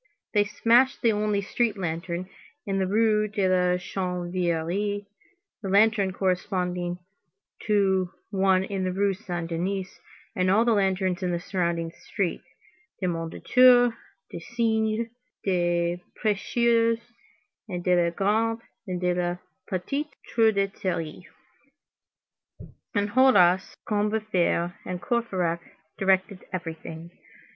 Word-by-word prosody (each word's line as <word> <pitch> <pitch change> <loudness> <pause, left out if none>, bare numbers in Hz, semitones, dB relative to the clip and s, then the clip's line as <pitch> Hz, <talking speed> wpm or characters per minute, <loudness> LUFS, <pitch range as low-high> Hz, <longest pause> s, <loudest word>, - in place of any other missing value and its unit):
They 205 -1 +4
smashed 240 +6 +3
the 230 - +5
only 210 -1 0
street 220 +1 0
lantern 170 0 -3 0.4
in 195 -2 -1
the 190 - +1
Rue 215 +1 +3
de 200 -2 0
la 180 -1 +3
Chanvrerie, 180 +2 -2 0.6
the 195 - -4
lantern 200 -1 +4
corresponding 180 -2 -1 0.7
to 190 -3 +2 0.2
one 190 -1 +3
in 195 -1 -3
the 185 - 0
Rue 195 +1 +1
Saint 175 -4 -5
Denis, 185 +3 -3 0.4
and 185 0 +1
all 215 +5 +4
the 235 - +4
lanterns 190 -2 +1
in 180 - 0
the 175 -1 -1
surrounding 170 -3 -2
streets, 190 +1 -4 0.5
de 190 - -2
Mondétour, 245 +9 +4 0.4
du - - -6
Cygne, 225 +2 0 0.3
des 175 -2 +1 0.2
Prêcheurs, 230 +2 +2 0.7
and 175 -2 -4
de 180 -1 +3
la - - +1
Grande 220 +5 0 0.3
and 180 -1 -3
de 180 0 +2
la 175 0 -1 0.3
Petite 275 +12 -3 0.2
Truanderie. 195 -6 0 1.7
Enjolras, 205 -4 +4
Combeferre, 210 -5 0
and 180 -1 -4
Courfeyrac 180 -5 -1 0.4
directed 190 0 +1
everything. 165 -2 -6
190 Hz, 110 wpm, -26 LUFS, 180-215 Hz, 1.7 s, the